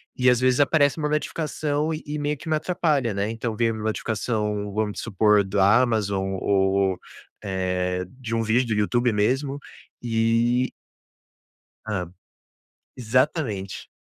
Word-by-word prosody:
E, 125 0 +3
às 125 -1 +3
vezes, 130 +1 +2
aparece 145 0 +3
uma 150 -1 -1
notificação 150 0 -1
e 155 - -6
e 150 +1 -4
meio 145 0 -1
que 160 - -8
me 155 - +2
atrapalha, 155 - 0
né. 100 +2 -1
Então, 115 -1 -3
veio 115 0 +1
uma 110 -1 -6
notificação, 105 -1 -2
vamos 105 -1 -2
supor 105 +1 +3
da 100 +4 +4
Amazon 100 -5 -1
ou, 95 -1 +2 0.4
eh, 90 -1 -1
de 115 -3 -3
um 115 - 0
vídeo 120 +3 +2
do - - 0
YouTube 120 +3 +2
mesmo 135 +7 0 0.4
e 120 +2 +1 1.2
Hã. 90 -5 -3 0.9
Exatamente. 125 - -1
115 Hz, 135 wpm, -24 LUFS, 100-135 Hz, 1.2 s, da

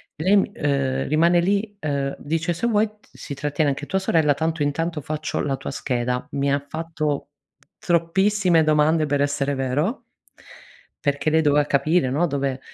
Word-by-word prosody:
lei, 195 +6 +2
ehm, 135 -4 -1
rimane 170 +4 +3
lì, 200 +4 0
uhm, 140 -2 -2
dice: 165 +3 -1
"Se 180 +8 -1
vuoi 220 -1 +2 0.2
si - - -8
trattiene 145 +1 0
anche 145 +1 -5
tua 190 - 0
sorella 160 -6 +2
tanto, 160 +2 -2
intanto 155 +2 -1
faccio 155 +2 -3
la 135 -1 -1
tua - - -6
scheda". 125 -2 -2
Mi 140 0 +1
ha 140 0 -1
fatto 155 -2 -3 0.5
troppissime 175 +1 +2
domande 155 +1 +3
per 145 0 0
essere 140 0 0
vero 135 - -1 1.0
perché, 145 +1 +1
lei 160 +1 +4
doveva 145 -1 +3
capire 145 +1 +2
no, 155 +7 +1
dove 140 -3 -2
150 Hz, 155 wpm, -23 LUFS, 140-170 Hz, 1.0 s, lei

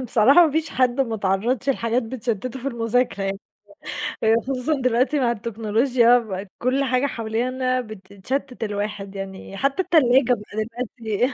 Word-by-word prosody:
آه، 255 - -4
بصراحة 260 +9 +6
ما - - -1
فيش 320 +1 -1
حد 255 0 +1
متعرضش 225 +1 0
لحاجات 235 -1 0
بتشتته 235 +1 -4
في 275 - -1
المذاكرة 235 -3 0
يعني. 195 0 -2 1.0
خصوصًا 265 +4 -1
دلوقتي 255 +4 +2
مع 245 -3 +2
التكنولوجيا 230 -1 +1
كل 255 +3 +1
حاجة 255 0 +1
حوالينا 255 +1 -1
بتتشتت 220 +5 -5
الواحد، 205 -1 -4
يعني 195 0 -7
حتّى 275 - +1
التلاجة 265 -8 +4
بقى 210 -3 -5 0.5
دلوقتي 230 +3 -1
240 Hz, 130 wpm, -23 LUFS, 215-260 Hz, 1.0 s, بصراحة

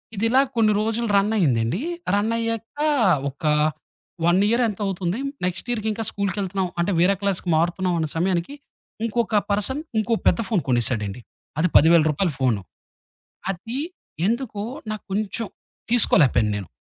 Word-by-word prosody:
ఇదిలా 225 +6 +3
కొన్ని 220 -2 +3
రోజులు 225 +2 -1
రన్ 200 +2 +2
అయిందండి. 125 - +1 0.3
రన్ 210 +2 +1
అయ్యాక 230 +4 -3 0.5
ఒక 140 +5 -16 0.8
1 175 +2 +4
ఇయర్ 235 +2 +2
ఎంతో 210 -1 -5
అవుతుంది. 190 +2 -2 0.3
నెక్స్ట్ 185 +4 -3
ఇయర్‌కి 220 -2 -2
ఇంకా 225 +1 -4
స్కూలుకెళ్తున్నాం. 195 -2 -2
అంటే 170 +4 +1
వేరే 185 +3 +4
క్లాస్‌కి 195 -3 -1
మారుతున్నాం 175 +2 0
అన్న 160 - 0
సమయానికి, 180 - 0 0.5
ఇంకొక 230 -1 -1 0.2
పర్సన్ 210 +8 0 0.2
ఇంకోొ 225 +1 +1
పెద్ద - - +3
ఫోన్ 205 -6 +2
కొనేసాడండి. 120 -3 0 0.4
అది 170 - +3
10000 165 +1 +6
రూపాయల 170 +4 0
ఫోను. 120 -6 +1 0.9
అది 225 +7 -6 0.5
ఎందుకో 230 -2 -2 0.3
నాకు 215 - -5
కొంచెం 210 +2 -2 0.4
తీసుకోలేపోయాను 135 - +4
నేను. 100 -3 -6
195 Hz, 135 wpm, -23 LUFS, 170-225 Hz, 0.9 s, 10000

